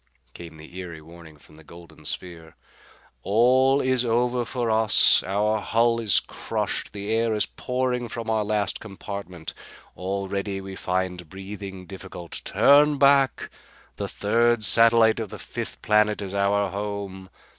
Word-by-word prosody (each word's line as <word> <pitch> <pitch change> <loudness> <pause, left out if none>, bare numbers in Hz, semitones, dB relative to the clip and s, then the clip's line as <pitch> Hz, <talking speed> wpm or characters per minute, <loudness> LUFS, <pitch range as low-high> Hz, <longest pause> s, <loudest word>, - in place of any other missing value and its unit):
came 85 -2 -11
the 80 +4 -11
eery 85 -3 -7
warning 80 0 -14
from 75 - -21
the 80 +1 -14
golden 80 -1 -15
sphere. 80 -1 -6 0.7
"All 130 - +3
is 130 -1 +1
over 120 +1 0
for 120 -1 -2
us. 110 -2 +4
Our 105 +3 0
hull 115 +2 +1
is 110 -4 +5
crushed. - - -4
The 100 +1 -5
air 115 0 +1
is 105 - +1
pouring 125 -1 -2
from 115 0 -6
our 110 -1 +1
last 105 -1 -1
compartment. 100 -4 -7 0.4
Already 100 +1 -3
we 95 0 -8
find 90 -3 -3
breathing 95 0 -8
difficult. 95 -2 -7
Turn 145 +1 +4
back! 140 -1 +3 0.5
The - - -3
third 115 +2 +1
satellite 115 0 +5
of 110 -3 -4
the - - -8
fifth - - -7
planet 105 0 +3
is 95 -1 -6
our 100 0 +1
home. 100 -1 -5
100 Hz, 145 wpm, -24 LUFS, 95-115 Hz, 0.7 s, is